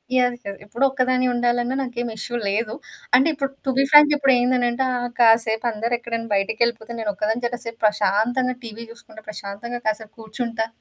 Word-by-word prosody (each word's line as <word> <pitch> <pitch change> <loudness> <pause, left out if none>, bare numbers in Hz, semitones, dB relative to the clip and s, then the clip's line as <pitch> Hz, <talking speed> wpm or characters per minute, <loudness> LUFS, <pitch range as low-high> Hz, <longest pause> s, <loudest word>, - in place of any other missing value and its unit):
Yeah! 245 -1 +3
కదా! 200 -1 -6
ఎప్పుడు 240 +6 -3
ఒక్కదాని 255 -1 +1
ఉండాలన్నా 240 +1 0
నాకేమి 240 -2 -4
ఇష్యు 240 +3 -4
లేదు. 215 +2 -1 0.4
అంటే 265 +5 +5
ఇప్పుడు 275 -1 -3
టు 265 - +1
బీ 275 - +5
ఫ్రాంక్ 295 0 +8
ఇప్పుడేందనంటే 250 -2 +2
ఆహ్, 245 0 -2
కాసేపు 225 0 +4
అందరూ 230 +3 -3
ఎక్కడైనా 230 -1 -4
బయటికెళ్ళిపోతే, 225 +3 -1
నేను 210 -2 -1
ఒక్కదాని 220 +5 -2
చె 240 - -1
కాసేపు 230 -1 -7
ప్రశాంతంగా 225 +5 +1
టీవీ 230 +1 -8
చూసుకుంటా 220 -2 -14
ప్రశాంతంగా 215 +4 -6
కాసేపు 215 0 -3
కూర్చుంటా. 225 0 -3
235 Hz, 160 wpm, -22 LUFS, 220-250 Hz, 0.4 s, ఫ్రాంక్